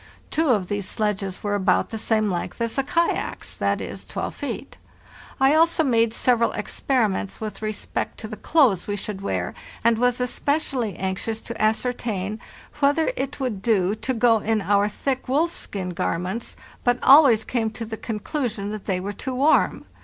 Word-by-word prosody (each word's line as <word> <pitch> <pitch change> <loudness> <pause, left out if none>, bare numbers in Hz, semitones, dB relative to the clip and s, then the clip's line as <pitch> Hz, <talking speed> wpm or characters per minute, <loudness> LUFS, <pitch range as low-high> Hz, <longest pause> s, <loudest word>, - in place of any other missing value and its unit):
'Two 320 -1 +1
of 205 -7 +2
these 205 -1 -3
sledges 200 -3 -2
were 205 -1 0
about 190 -2 +2
the 225 - -4
same 215 -1 +1
length 175 +6 -4
as 230 -1 -1
the 275 - +2
kayaks—that 335 +5 -1
is, - - -6
12 - - -4
feet. - - -6 0.6
I 270 +2 +5
also 330 +1 +4
made 230 -5 +3
several 235 0 +2
experiments 215 -7 -1
with 215 -1 -6
respect 215 -1 -3
to 220 - -6
the 215 - -6
clothes 250 - +3
we 205 - -1
should 200 -1 -5
wear, 90 - -2 0.3
and 230 -1 +3
was 245 0 +2
especially 250 - -1
anxious 190 +4 -2
to 235 - -6
ascertain 215 -2 -1 0.4
whether 290 - +3
it 270 +1 -4
would 245 -8 -2
do 200 -4 +2
to 260 +4 -2
go 230 -1 +4
in 220 +1 +1
our 205 +1 +3
thick 265 +5 -2
wolfskin 255 - -1
garments, 180 +7 -3 0.3
but 245 0 +3
always 270 -6 +7
came 225 -1 -1
to 225 +1 -6
the 220 0 -5
conclusion 220 -1 -3
that 215 -2 -7
they 185 -3 0
were 200 +3 -4
too 255 +5 -5
warm. 285 +5 +3
225 Hz, 170 wpm, -24 LUFS, 205-255 Hz, 0.6 s, always